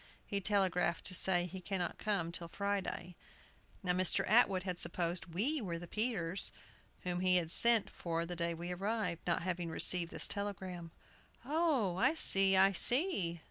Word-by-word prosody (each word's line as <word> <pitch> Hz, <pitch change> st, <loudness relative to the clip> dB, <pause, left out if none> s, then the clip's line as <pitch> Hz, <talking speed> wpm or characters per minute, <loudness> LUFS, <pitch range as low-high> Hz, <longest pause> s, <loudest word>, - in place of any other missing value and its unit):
He 200 Hz, -1 st, -3 dB
telegraphed 185 Hz, -4 st, 0 dB
to 185 Hz, -, -4 dB
say 180 Hz, -1 st, +2 dB
he 185 Hz, +1 st, -8 dB
cannot 180 Hz, -1 st, -4 dB
come 195 Hz, -6 st, -2 dB
till 170 Hz, -1 st, -4 dB
Friday. 195 Hz, -1 st, -4 dB, 0.7 s
Now, 180 Hz, -, 0 dB
Mr. 185 Hz, 0 st, +1 dB
Atwood 200 Hz, -4 st, +3 dB
had 180 Hz, -2 st, -5 dB
supposed 175 Hz, 0 st, -2 dB
we 275 Hz, -, 0 dB
were 175 Hz, -5 st, -4 dB
the 175 Hz, -, -9 dB
Peterses, 200 Hz, -4 st, 0 dB, 0.5 s
whom 180 Hz, -1 st, -3 dB
he 185 Hz, 0 st, +2 dB
had 165 Hz, -2 st, -2 dB
sent 235 Hz, +1 st, +3 dB
for 165 Hz, -1 st, -4 dB
the 175 Hz, +1 st, -6 dB
day 170 Hz, 0 st, -2 dB
we 175 Hz, +2 st, -6 dB
arrived, 195 Hz, -2 st, -3 dB
not 170 Hz, 0 st, 0 dB
having 175 Hz, -2 st, -3 dB
received 170 Hz, +1 st, +5 dB
this -, -, 0 dB
telegram." 190 Hz, -4 st, -5 dB, 0.6 s
"Oh, 280 Hz, -, 0 dB
I 310 Hz, +11 st, +2 dB
see, 195 Hz, -9 st, +4 dB
I 195 Hz, +1 st, +5 dB
see!" 200 Hz, -, +3 dB
185 Hz, 165 wpm, -33 LUFS, 175-200 Hz, 0.7 s, received